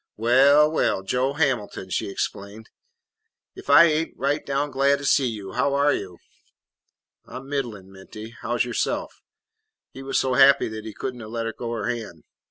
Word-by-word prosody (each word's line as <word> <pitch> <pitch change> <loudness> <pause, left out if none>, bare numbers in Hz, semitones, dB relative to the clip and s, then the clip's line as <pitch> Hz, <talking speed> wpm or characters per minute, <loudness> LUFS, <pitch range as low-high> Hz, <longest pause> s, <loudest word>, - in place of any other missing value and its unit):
"Well, 140 +7 +5
well, 95 -10 0
Joe 125 +7 -1
Hamilton," 125 -10 -2
she - - -2
exclaimed, 100 +2 -6 0.8
"if - - -13
I 145 +4 +8
ain't 160 0 0
right 140 +3 -1
down 140 +1 -2
glad 140 +1 +2
to 140 - -8
see 135 -2 +3
you! 105 -5 -6
How 140 +4 0
are 145 0 +3
you?" 90 -3 -6 1.1
"I - - -11
'm 130 +1 -8
middlin', 120 -9 -5
Minty. 105 +3 -11
How 120 +2 -2
's 120 - +1
yourself?" 120 -2 -3 0.7
He 135 - -10
was 135 0 -2
so 130 -1 +1
happy 135 +2 +5
that 110 0 -8
he 110 - -7
could 130 +4 -4
n't 115 -3 -10
let 115 -1 -4
go 120 -1 -5
her 110 -3 -3
hand. 110 -10 -5
125 Hz, 175 wpm, -23 LUFS, 110-140 Hz, 1.1 s, I